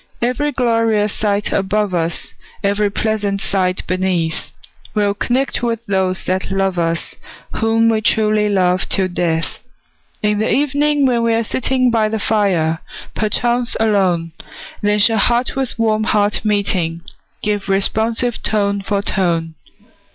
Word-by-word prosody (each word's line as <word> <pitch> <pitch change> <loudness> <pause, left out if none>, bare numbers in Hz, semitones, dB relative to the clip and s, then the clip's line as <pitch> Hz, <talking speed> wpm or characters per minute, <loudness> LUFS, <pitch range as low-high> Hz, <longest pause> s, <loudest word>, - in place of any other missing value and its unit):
Every 255 +5 0
glorious 230 -5 +1
sight 205 -1 -1
above 200 0 0
us, 165 -1 -1 0.3
Every 200 +1 +1
pleasant 205 -1 -1
sight 185 -2 -1
beneath, 180 -3 -1 0.5
We'll 205 -1 +2
connect 250 +6 0
with 230 -1 -2
those 190 -2 -1
that 185 +1 -2
love 195 -2 0
us, 165 0 -1 0.4
Whom 225 +1 +2
we 220 -1 +2
truly 215 -1 +2
love 185 -2 +1
till 190 -2 +2
death! 165 -2 -1 0.6
In 210 0 +1
the 220 - 0
evening, 290 +1 +2
when 245 -3 +2
we're 230 0 +1
sitting 255 +2 +1
By 220 -2 +2
the 220 - -1
fire, 190 -7 +1 0.3
perchance 240 +3 0
alone, 190 -6 +1 0.5
Then 210 0 +2
shall 220 +1 +4
heart 240 +4 +1
with 265 -3 -2
warm 220 -1 +1
heart 210 -1 +1
meeting, 190 -6 0 0.4
Give 205 -2 -1
responsive 225 +4 +1
tone 200 -2 0
for 200 0 -1
tone. 170 -5 0
210 Hz, 135 wpm, -18 LUFS, 190-225 Hz, 0.6 s, shall